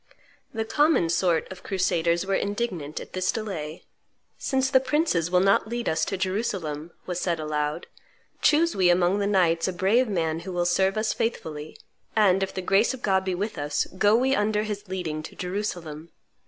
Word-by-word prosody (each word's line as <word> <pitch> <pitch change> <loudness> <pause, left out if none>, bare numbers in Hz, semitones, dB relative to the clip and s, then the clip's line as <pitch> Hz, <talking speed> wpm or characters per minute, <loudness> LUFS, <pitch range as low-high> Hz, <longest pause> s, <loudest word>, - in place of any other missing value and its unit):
The 220 0 -3
common 295 - +3
sort 170 -1 +1
of 185 0 -9
crusaders 175 -2 0
were 195 - -1
indignant 195 -8 -2
at - - -11
this 185 0 0
delay: 170 -8 -5 0.6
"Since 265 -1 0
the 260 - +6
princes 265 - +1
will 180 0 +3
not 195 +2 +3
lead 240 +1 -3
us 160 - +1
to 195 - -3
Jerusalem," 185 -6 -2 0.2
was 180 -1 -3
said 170 -3 -1
aloud, 150 +1 -2 0.6
"choose 330 +3 +3
we 185 -2 +4
among 175 +3 +3
the 200 - 0
knights 170 -5 +2
a - - 0
brave 205 +8 +2
man 165 -5 -1
who 185 - -7
will 175 -1 0
serve 190 +3 +2
us 215 0 +1
faithfully, 155 -9 -4 0.4
and, 195 -3 +4
if 195 - -1
the 185 - -3
grace 200 +8 +3
of 250 - -15
God 190 -2 +2
be 190 -1 -1
with 200 -2 -3
us, 145 0 0
go 205 +2 +5
we 260 +3 +2
under 210 -3 +1
his 210 -1 -5
leading 175 -5 -3
to 155 - -10
Jerusalem. 175 -5 -4
190 Hz, 185 wpm, -25 LUFS, 170-210 Hz, 0.6 s, the